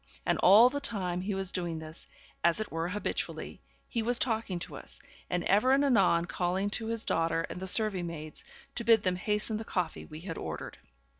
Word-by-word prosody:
And - - 0
all 210 +6 +7
the 285 - -3
time 180 -8 0
he 195 +1 -3
was 190 -1 +2
doing 175 -3 -3
this, 160 0 -9 0.4
as 170 +3 +4
it 215 - -3
were 165 +1 -3
habitually, 205 +3 -4 0.3
he 230 - -2
was 240 +2 +2
talking 225 -7 0
to 175 - -5
us, - - -9 0.3
and 180 -1 -1
ever 215 +7 +3
and 280 +1 +3
anon 190 -10 +3
calling 185 +3 -2
to 225 +1 +1
his 230 0 -1
daughter 165 0 0
and - - -7
the 190 - -5
serving 195 -3 +5
maids, 155 -2 -5 0.3
to 235 - -2
bid 225 -2 +4
them 185 -1 0
hasten 210 +3 0
the 220 - -5
coffee 180 -6 -3
we 155 +1 -10
had 165 -2 -6
ordered. - - -7
190 Hz, 205 wpm, -29 LUFS, 175-220 Hz, 0.4 s, all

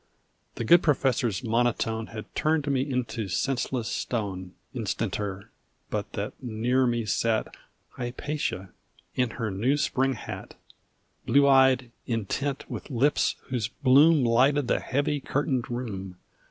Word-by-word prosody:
The - - -3
good 170 +9 +6
Professor's 130 - +1
monotone 115 -1 0
Had 110 -2 -9
turned 155 -1 +1
me 135 -2 +2
into 125 -5 -2
senseless 125 +4 -1
stone 95 -7 -3 0.2
Instanter, 105 -3 -3 0.4
but - - -3
that - - -3
near 125 +2 +1
me 120 -2 0
sat 110 +2 0 0.4
Hypatia 120 -6 -3 0.4
in 125 -2 +1
her 110 -1 -3
new 120 +9 +1
spring 135 0 +1
hat, 110 - -8 0.7
Blue 140 0 +5
eyed, 130 -2 +5 0.2
intent, 130 +5 -2
with - - -7
lips 135 +2 +2
whose 120 -5 -1
bloom 140 +4 +5
Lighted 130 +4 +3
the - - +2
heavy 145 +2 0
curtained 135 -2 -1
room. 100 -7 -5
125 Hz, 125 wpm, -27 LUFS, 110-135 Hz, 0.7 s, good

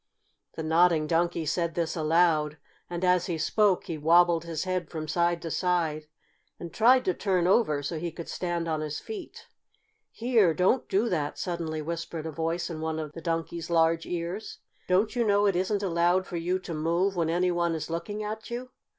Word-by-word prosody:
The 160 - -4
Nodding 160 0 +3
Donkey 170 +1 0
said 170 +1 -1
this 165 -1 -1
aloud, 155 -2 +2 0.3
and, 175 +1 -2
as 180 -1 +3
he 170 -3 -2
spoke, 195 +4 +2
he 160 -2 -5
wobbled 170 +1 +4
his 165 -2 -3
head 185 -3 -2
from 155 -2 -5
side 170 +1 +1
to 165 - -4
side 165 -4 0 0.5
and 170 -1 -8
tried 250 +3 +5
to 185 - +2
turn 185 -2 0
over 180 -7 +2
so 155 +3 -3
he 170 +1 -3
could 170 +1 -8
stand 175 -2 -3
on 155 -1 -1
his 150 -1 -4
feet. 420 -5 -8 0.6
"Here! 225 -8 +2
Don't 190 +8 +2
do 205 +5 +2
that!" 150 -6 -2
suddenly 165 -3 -3
whispered 165 0 -5
a 160 - -3
voice 165 +3 -2
in 160 -2 -6
one 160 0 -2
of 155 -2 -4
the 165 - -8
Donkey's 165 0 -3
large 165 0 +2
ears. 175 +5 -4 0.3
"Don't 195 +6 +2
you 240 - +2
know 205 -1 +3
it 200 -3 +2
isn't 195 +3 0
allowed 175 +1 +2
for 175 - -5
you 175 +3 0
to 185 -2 -7
move 170 +5 0
when 165 -2 0
any 180 +2 +2
one 170 -1 0
is 155 0 -5
looking 205 +6 -4
at 215 +1 -5
you?" 245 +1 -5
170 Hz, 195 wpm, -27 LUFS, 160-185 Hz, 0.6 s, tried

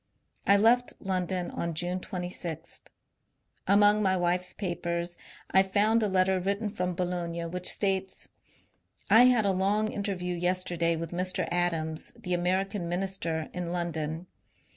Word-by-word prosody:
I 200 - +7
left 240 +4 +3
London 185 -1 -2
on 170 -1 -3
June 175 +3 -1
26. 175 -3 -5 0.9
Among 205 +1 +5
my 190 -2 +2
wife's 180 +1 0
papers 175 -2 -3 0.4
I 190 - +6
find 210 +4 +2
a 215 - +2
letter 190 -1 +2
written 200 +3 -1
from 180 -3 -2
Boulogne 170 -2 -3
which 180 0 +3
says: 195 -1 -1 0.4
— - - -43 0.3
I 230 +4 +8
had 245 -4 +4
a 200 - +3
long 205 +3 +1
interview 190 -3 -3
yesterday 175 -1 0
with 165 0 -5
Mr. 185 0 -1
Adams 165 -3 -1
the 180 - -4
American 185 +1 0
Minister 175 -3 -2
in 175 -1 -4
London. 165 -1 -3
180 Hz, 140 wpm, -28 LUFS, 175-195 Hz, 0.9 s, I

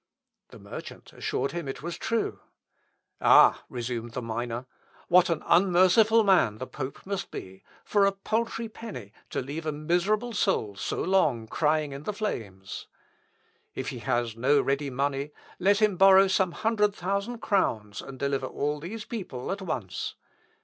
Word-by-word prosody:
The - - -13
merchant - - -10
assured 140 - -2
him 170 -4 -4
it 135 - -6
was 170 0 -4
true. 230 -1 -1 0.8
"Ah!" - - +7
resumed 120 -1 -4
the 125 - -3
miner, 120 +2 -3 0.4
"what 180 +1 +6
an 165 -2 -1
unmerciful 190 +5 +5
man 180 - +4
the 130 - -5
pope 135 0 -7
must 195 0 -3
be, 95 +1 -9 0.2
for 200 -1 +3
a - - +3
paltry 225 +3 -2
penny 130 - -9 0.2
to - - -2
leave 155 +5 -5
a - - +1
miserable 180 +10 0
soul 190 - 0
so - - -3
long 150 -12 +2
crying 150 +4 +1
in 140 0 -7
the 210 - -3
flames. 100 - -5 0.9
If - - -3
he - - -6
has 120 -2 -1
no 135 +5 +3
ready 140 +1 0
money, 140 +2 -2 0.3
let 200 +2 +4
him 205 -4 +3
borrow 195 +1 +7
some 190 -2 +1
hundred 210 -2 +1
thousand 200 +6 -2
crowns, 110 - 0
and 135 -1 -10
deliver 135 -1 -1
all 150 +2 -2
these 210 +8 -6
people 180 - -5
at 195 +1 -3
once. 120 - -4
160 Hz, 155 wpm, -27 LUFS, 130-195 Hz, 0.9 s, Ah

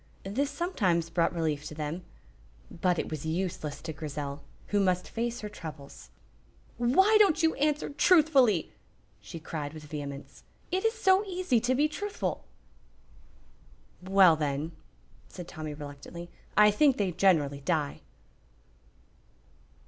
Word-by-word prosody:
This 260 +9 -1
sometimes 200 - 0
brought 170 0 +2
relief 155 -4 -1
to 155 - -7
them, 155 +4 -4 0.7
but 175 +1 0
it - - -3
was 155 -3 -4
useless 165 -2 -3
to 160 -1 -5
Grizel, 145 -1 -5 0.3
who 205 - +2
must 185 -2 +1
face 235 +1 -3
her 210 - -4
troubles. 160 -8 -10 0.7
"Why 380 - +5
don't 380 -6 +4
you 320 - +4
answer 295 +1 0
truthfully?" 285 - +4 0.5
she 135 +11 -9
cried, 155 -2 -5
with 155 - -9
vehemence. 145 -2 -7 0.3
"It 370 +1 0
is 450 +1 +2
so 390 -2 +4
easy 365 - +1
to 245 +3 +1
be 295 +3 +3
truthful!" 410 +7 -4 1.6
"Well, 190 -2 +6
then," 150 +1 -2 0.6
said 175 -2 -9
Tommy, 155 -3 -6
reluctantly, 145 +4 -9 0.3
"I 210 0 +7
think 270 +5 +3
they 195 -3 0
generally 160 -6 +2
die." 150 -1 -1
180 Hz, 130 wpm, -29 LUFS, -, 1.6 s, I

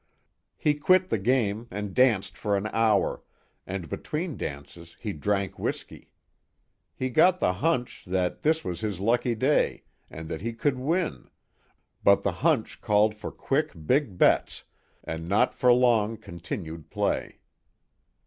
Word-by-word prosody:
He 150 - +2
quit 185 +5 +3
the 115 - 0
game 115 0 0
and 100 0 -5
danced 120 -7 +3
for 100 -2 0
an 100 - -3
hour, 115 -1 +2 0.5
and 95 -3 -4
between 155 - -4
dances 80 +4 -8
he 105 - -4
drank 100 +3 -2
whiskey. - - -5 0.9
He 130 0 -3
got 180 +7 +4
the 90 - +2
hunch 125 - -1
that 90 -1 -1
this 160 +1 +1
was 90 -2 -3
his 105 -4 -3
lucky 120 +3 +1
day 135 +7 +1 0.3
and 80 0 -8
that - - -5
he 115 +2 -3
could 130 +3 0
win, 165 +6 -1 0.7
but 100 0 +5
the 100 - +1
hunch 155 -8 +1
called 105 +1 +3
for 105 - -7
quick 150 +3 -1
big 125 - +1
bets, - - +2 0.4
and 80 +1 -5
not 100 - +3
for 125 - +3
long 115 -3 +3
continued 85 -4 -7
play. - - -2
110 Hz, 145 wpm, -27 LUFS, 95-130 Hz, 0.9 s, but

